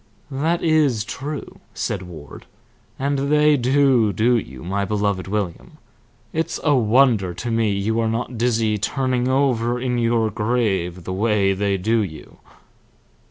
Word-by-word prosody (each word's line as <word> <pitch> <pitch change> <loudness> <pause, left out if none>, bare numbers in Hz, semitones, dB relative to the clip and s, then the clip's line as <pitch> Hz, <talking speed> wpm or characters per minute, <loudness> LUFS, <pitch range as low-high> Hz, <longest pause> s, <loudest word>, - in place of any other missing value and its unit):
"That 160 +6 -1
is 150 -9 +2
true," 140 +5 -6 0.2
said - - -2
Ward. 80 -6 -11 0.5
"And 140 +1 -1
they 150 0 +5
do 130 -3 +3
do 115 +6 +2
you, 65 - -4
my 100 +3 -1
beloved 100 -2 -1
William. 105 - -4 0.6
It's 160 +1 -2
a 150 - +3
wonder 115 -6 +3
to 120 +5 -4
me 115 -1 +1
you 105 +3 -1
are 115 -1 +1
not 120 +2 -3
dizzy 110 -2 +1
turning 130 +2 -1
over 125 -3 +1
in 125 -1 -1
your 115 -2 +1
grave 100 -6 -1
the 95 - -4
way 100 -1 +2
they 100 0 0
do 110 +5 +1
you." 80 -7 -7
115 Hz, 145 wpm, -21 LUFS, 100-130 Hz, 0.6 s, they